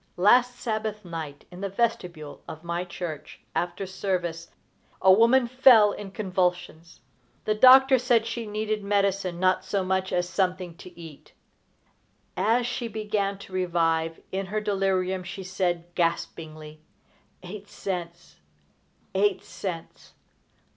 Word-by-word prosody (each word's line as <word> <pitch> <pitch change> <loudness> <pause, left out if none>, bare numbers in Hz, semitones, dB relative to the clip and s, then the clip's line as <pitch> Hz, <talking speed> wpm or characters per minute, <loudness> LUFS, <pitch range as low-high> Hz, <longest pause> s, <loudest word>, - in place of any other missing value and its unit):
Last 245 +7 +5
Sabbath 215 -3 -3
night, 160 -4 -7
in 180 +1 -10
the 200 - -2
vestibule 185 -8 -2
of 160 +1 -9
my 170 +1 -2
church, 170 -3 -7
after 180 +3 -2
service, 180 -3 -3 0.5
a 190 - +6
woman 235 +5 +5
fell 245 -4 +6
in 200 -1 -7
convulsions. 180 - -2 0.4
The 215 - +2
doctor 260 +3 +7
said 240 -2 +2
she 230 -1 -4
needed 215 0 -2
medicine 195 -3 0
not 185 0 +2
so 195 0 -1
much 190 0 0
as 175 0 0
something 185 -2 -1
to 180 -2 -13
eat. 160 -4 -12 1.0
As 235 +3 +2
she 245 0 -3
began 210 -2 -2
to 190 - -16
revive 165 -3 0
in 195 0 -3
her 215 +3 -1
delirium, 190 -3 0
she 190 +2 -7
said, 180 -2 -1
gaspingly: 155 -2 -3 0.6
"Eight 200 +3 -9
cents! 175 -3 -6 0.8
Eight 195 0 +1
cents! 175 -4 -7
190 Hz, 125 wpm, -26 LUFS, 175-210 Hz, 1.0 s, doctor